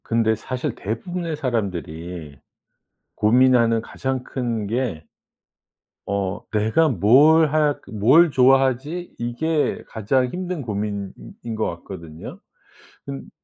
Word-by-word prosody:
근데 115 -1 +1
사실 125 +3 -4
대부분의 165 - -4
사람들이 85 - -4 0.8
고민하는 115 0 +4
가장 130 +2 -3
큰 115 -5 -3
게 110 -8 -2 1.1
어 100 -1 -2
'내가 110 +10 +2
뭘 145 - +5
할 150 -2 +2
뭘 130 +11 +5
좋아하지?' 135 +5 +2
이게 145 +7 -1
가장 120 +4 0
힘든 180 +2 -4
고민인 100 -3 -3 0.4
것 110 0 -1
같거든요. 85 -3 -10 0.7
근 70 -1 -7
120 Hz, 200 characters per minute, -22 LUFS, 100-140 Hz, 1.1 s, 뭘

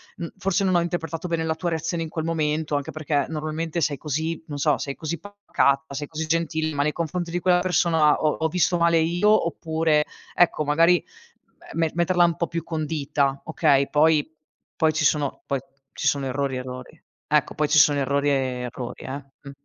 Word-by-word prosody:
mhmm, 170 - -5
forse 195 +1 0
non 190 -1 +2
ho - - +5
interpretato 170 -1 -3
bene 165 -1 -1
la 160 0 -1
tua 170 +2 -2
reazione 165 +1 -2
in 160 - -6
quel 160 0 -4
momento. 155 -2 -1
Anche 140 - -5
perché 150 -2 -1
normalmente 155 +1 -3
sei 145 -2 0
così, 155 +3 -3
non 145 -2 -5
so, 150 +1 +2
sei 140 -1 -4
così 165 0 -4
pacata, 160 -7 0
sei 145 +1 -4
così 160 +1 -4
gentile, 160 -1 0
ma 145 0 +1
nei 150 +1 0
confronti 170 +1 -3
di 175 - -1
quella 180 0 +4
persona 170 -4 +3
ho 155 -1 +2
ho 160 - +1
visto 175 +2 +1
male 170 -1 +3
io, 175 +6 +3
oppure" 160 -2 +1 0.3
Ecco 175 -3 +3
magari 165 +4 +3 0.7
me 165 -1 +1
me - - -7
metterla 175 +1 +3
un 170 -1 +2
po' 170 - -1
più 170 -1 -4
condita, 150 -4 -1
okay. 145 -3 +2
Poi 155 0 +3 0.5
poi 160 -1 +3
ci 155 0 0
sono 145 -2 +1
poi 140 -1 -1 0.3
ci - - -5
sono 140 -1 +1
errori, 135 0 -2
errori. 125 0 -8 0.3
Ecco 150 -2 +1
poi 150 -1 0
ci - - +4
sono 145 0 +5
errori 140 +1 0
e - - +3 0.4
errori 125 0 -7
eh, 140 +1 -6 0.2
mh. 140 - -10
160 Hz, 200 wpm, -24 LUFS, 145-170 Hz, 0.7 s, ho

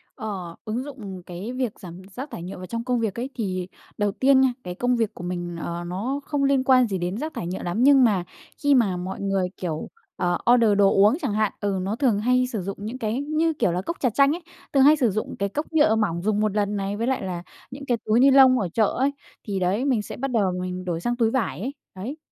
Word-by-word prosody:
Ờ, 185 -6 -6
ứng 225 +4 -2
dụng 210 -10 -8
cái 185 +7 -6
việc 255 -4 -3
giảm 180 -1 -10
rác 270 +4 -6
thải 170 - -7
nhựa 185 +2 -7
vào 185 - -7
trong 230 +4 -4
công 250 0 0
việc 220 -4 -1
ấy, 255 +3 -3
thì 185 -6 -3 0.3
đầu 205 -1 +1
tiên 265 +5 +4
nha 260 -2 +3
cái 180 -1 -6
công 245 +5 +1
việc 225 -3 0
của - - -9
mình, 175 -1 -4
ờ, 170 +1 -4
nó 220 +11 -2
không 290 -1 -1
liên 275 -1 +3
quan 255 -2 +5
gì 195 -3 -2
đến 180 +3 -3
rác 310 +6 -4
thải 170 - -4
nhựa 185 +2 -4
lắm, 175 +7 0
nhưng 275 -1 +7
mà 205 -7 +3 0.4
khi 285 -1 +5
mà 205 -8 +2
mọi 185 +2 -5
người, 195 -2 0
kiểu, 160 -4 -4 0.3
ờ, 175 -1 0 0.2
order 225 -4 +4
đồ 200 -1 +5
uống 210 +7 +5
chẳng 265 -9 -1
hạn, 215 -1 +1
ừ, 200 -2 -1
nó 195 +3 -2
thường 235 -5 +2
hay 250 +3 +2
sử 225 -5 -4
dụng 195 +2 -5
những 220 +5 -5
cái 225 0 -2
như, 310 +3 0
kiểu 190 - +1
là, 180 +2 -1
cốc 335 - -4
trà 255 - +2
chanh 275 +6 +3
ấy, 350 - -8 0.3
thường 270 -2 +5
hay 295 +3 +7
sử 260 -6 +2
dụng 215 +3 -3
cái 200 0 0
cốc 300 +9 -3
nhựa 295 -8 +4
mỏng 195 -6 0
dùng 210 +2 0
một 210 -1 0
lần 205 0 0
này, 200 0 -2
với 230 +2 -1
lại 265 0 0
là 180 -2 -4 0.3
những 280 +2 -8
cái 245 -3 +1
túi 215 +2 +3
ni-lông 265 -1 +7
ở 190 -5 -1
chợ 220 - +3
ấy 275 +2 +2 0.4
thì 200 -2 -1
đấy, 190 +8 0
mình 255 -6 +2
sẽ - - -8
bắt 270 +1 -3
đầu 205 -6 +2
mình 185 0 -4
đổi 170 -2 -2
sang 240 +5 -1
túi 230 -2 +2
vải 240 -9 -1
ấy, 260 +6 -3 0.2
đấy. 230 +11 -6
215 Hz, 260 wpm, -24 LUFS, 185-260 Hz, 0.4 s, nhưng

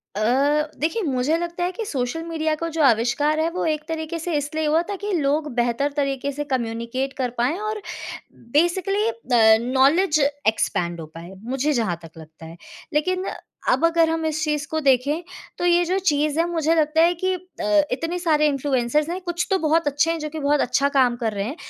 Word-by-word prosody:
अ, - - -2 0.6
देखिए 330 +10 0
मुझे 280 +2 +1
लगता 345 +1 -3
है 360 - 0
कि 445 +3 -5
सोशल 270 +1 -3
मीडिया 315 -2 -1
का 335 +2 -4
जो 320 - +1
आविष्कार 270 +5 +2
है, 325 +1 +1
वो 360 - -2
एक 305 -1 -1
तरीके 320 +1 -4
से 340 +1 -3
इसलिए 310 +2 -2
हुआ 315 +3 +3
था 405 - -2
कि 415 - -2
लोग 295 -1 0
बेहतर 240 +4 0
तरीके 275 0 -1
से 295 +2 -4
कम्युनिकेट 235 +3 -2
कर 255 -2 -1
पाएँ 255 +9 +1
और 430 0 -3 0.8
बेसिकली 380 +6 +2
अ, 230 - +4
नॉलेज 285 +7 +3 0.3
एक्सपैंड 175 -5 0
हो - - -7
पाए, 170 +3 -9
मुझे 270 +5 -1
जहाँ 220 -9 0
तक 165 - -11
लगता 160 +1 -13
है। 165 +1 -11 0.4
लेकिन 365 +5 0 0.4
अब 330 - +3
अगर 335 -1 +3
हम 325 0 -1
इस 315 0 -1
चीज़ 300 -2 -1
को 315 - 0
देखें, 280 +5 +2 0.3
तो 350 - -2
ये 350 0 +4
जो 370 +3 0
चीज़ 300 -3 +1
है, 335 - +3
मुझे 325 -1 +1
लगता 315 0 +2
है 345 +1 +5
कि 375 - +2
अ, 315 -4 0
इतने 330 +7 -2
सारे 305 -3 +3
इन्फ्लुएंसर्स 280 +1 0
हैं 360 +2 -3
कुछ 345 -1 -2
तो 385 - +4
बहुत 320 0 +2
अच्छे 290 +3 +2
हैं 330 - -2
जो 305 0 -4
कि 315 - -6
बहुत 290 0 +2
अच्छा 275 +3 +1
काम 255 -4 +3
कर 220 - 0
रहे 200 0 -2
हैं। 275 +7 -4
300 Hz, 205 wpm, -22 LUFS, 260-330 Hz, 0.8 s, है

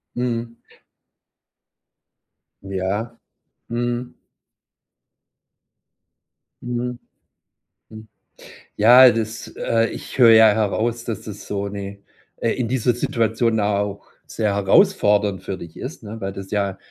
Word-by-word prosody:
Mhm. 115 -1 -3 2.0
Ja, 100 +4 -3 0.5
mhm. 120 +1 -3 2.5
Mhm. 120 0 -4 0.9
Hm, 110 0 -12 0.7
ja, 125 +4 +8
das, 115 -1 -3
äh 115 0 +1
ich - - -8
höre 120 -2 +8
ja 110 -1 +8
heraus, 110 +2 -1
dass 110 -4 -4
das 105 -1 -9
so 100 0 -3
ne 100 0 -7 0.4
äh, 115 - 0
in 125 -3 -2
dieser 125 -1 +1
Situation 115 -2 0
auch 100 -1 -1 0.2
sehr 105 -2 -1
herausfordernd 100 0 +3
für 95 - -5
dich 85 -2 -11
ist, 130 -1 -8
ne, 110 +1 -8
weil 95 0 -3
das 95 -1 -9
ja 100 -2 -1
110 Hz, 105 wpm, -21 LUFS, 100-120 Hz, 2.5 s, ja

